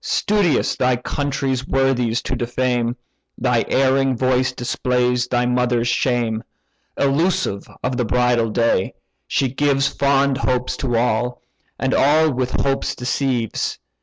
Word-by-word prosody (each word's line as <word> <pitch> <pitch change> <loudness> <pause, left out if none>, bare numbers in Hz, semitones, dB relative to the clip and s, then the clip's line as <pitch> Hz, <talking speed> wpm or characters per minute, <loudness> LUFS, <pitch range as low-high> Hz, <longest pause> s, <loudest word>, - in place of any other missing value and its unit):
Studious 200 -7 +1
thy 125 -1 +2
country's 135 0 -2
worthies 125 -3 +1
to 130 - -2
defame, 120 -1 -1 0.4
Thy 125 -2 +1
erring 135 -1 +2
voice 130 0 +1
displays 125 0 0
thy 125 0 0
mother's 125 -1 +1
shame. 120 -4 0 0.5
Elusive 140 - 0 0.2
of 125 0 -1
the 125 - 0
bridal 120 0 +2
day, 115 -4 0 0.3
she 135 - +1
gives 135 +1 +1
Fond 140 -1 +1
hopes 125 -1 -1
to 120 -4 -1
all, 120 +1 0 0.3
and 130 0 -1
all 155 +2 +4
with 125 0 -1
hopes 135 -1 -1
deceives. 125 -2 -2
125 Hz, 125 wpm, -20 LUFS, 120-135 Hz, 0.5 s, all